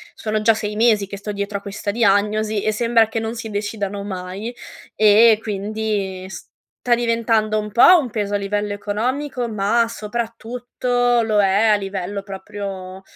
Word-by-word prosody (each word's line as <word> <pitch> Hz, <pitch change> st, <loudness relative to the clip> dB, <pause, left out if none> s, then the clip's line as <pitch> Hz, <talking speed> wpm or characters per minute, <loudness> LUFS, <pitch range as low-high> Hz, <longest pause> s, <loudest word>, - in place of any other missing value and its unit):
sono 215 Hz, -1 st, -2 dB
già 225 Hz, +1 st, +5 dB
6 210 Hz, -1 st, -4 dB
mesi 215 Hz, -3 st, +3 dB
che 200 Hz, -, -7 dB
sto 210 Hz, +1 st, -5 dB
dietro 200 Hz, 0 st, -3 dB
a -, -, -23 dB
questa 200 Hz, 0 st, -4 dB
diagnosi 210 Hz, -1 st, +1 dB
e 215 Hz, -, +1 dB
sembra 230 Hz, 0 st, +3 dB
che 225 Hz, +1 st, -3 dB
non 225 Hz, +1 st, -4 dB
si 225 Hz, -1 st, -6 dB
decidano 205 Hz, -1 st, -3 dB
mai, 190 Hz, +4 st, -6 dB, 0.4 s
e 215 Hz, +1 st, +6 dB
quindi 205 Hz, -2 st, -3 dB
sta 240 Hz, +4 st, -3 dB
diventando 230 Hz, -2 st, +1 dB
un 210 Hz, 0 st, -5 dB
po' 260 Hz, -, +7 dB
un 260 Hz, -, -3 dB
peso 205 Hz, -2 st, -3 dB
a 205 Hz, -, +3 dB
livello 205 Hz, +1 st, -2 dB
economico, 245 Hz, +5 st, -2 dB
ma 220 Hz, +2 st, +1 dB
soprattutto 240 Hz, +2 st, -1 dB
lo 215 Hz, -2 st, +1 dB
è 200 Hz, +3 st, +3 dB
a 215 Hz, -, +5 dB
livello 195 Hz, 0 st, -4 dB
proprio 195 Hz, -1 st, -7 dB
215 Hz, 160 wpm, -20 LUFS, 200-230 Hz, 0.4 s, po